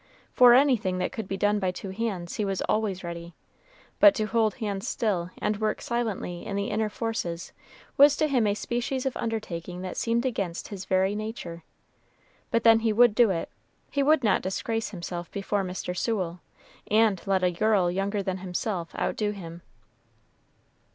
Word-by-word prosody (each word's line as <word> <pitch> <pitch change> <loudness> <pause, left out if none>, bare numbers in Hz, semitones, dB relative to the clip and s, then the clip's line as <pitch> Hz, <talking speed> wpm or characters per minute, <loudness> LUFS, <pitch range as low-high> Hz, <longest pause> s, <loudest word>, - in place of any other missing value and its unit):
For 245 -1 +8
anything 240 -9 +3
that 185 - -1
could 220 -4 -5
be 195 - -3
done 205 +1 +2
by 190 -2 0
two 190 +1 -6
hands, 190 -5 -3
he 215 - 0
was 195 -2 -1
always 205 -4 -1
ready; 170 0 -7 0.6
but 305 - +8
to 215 - 0
hold 220 -1 +1
hands 205 -5 -3
still 185 -6 -1
and 210 0 -1
work 215 0 0
silently 220 -7 -3
in 200 - -4
the 200 +1 -2
inner 215 0 0
forces 205 -7 -4 0.4
was 285 +1 +7
to 310 - +2
him 250 -7 +2
a 205 - +1
species 245 +4 -2
of 265 - -1
undertaking 180 -5 -4
that 185 - -5
seemed 235 +2 0
against 195 -9 -3
his 195 -2 -7
very 190 +1 +2
nature; 210 -6 -6 0.9
but 230 - +1
then 225 -1 +7
he 225 -1 +1
would 240 +1 +5
do 235 0 +5
it 170 -3 -2 0.4
he 280 - +1
would 290 0 +4
not 215 - +3
disgrace 225 +4 -2
himself 175 -2 -6
before 200 0 -2
Mr. 180 -1 -4
Sewell, 180 -4 -2 0.5
and 215 -4 +3
let 190 -1 +2
a 180 - +3
girl 190 -1 +2
younger 195 +2 -1
than 190 0 -3
himself 180 -1 -3
outdo 210 -1 -1
him. 175 -4 -7
205 Hz, 175 wpm, -27 LUFS, 185-225 Hz, 0.9 s, For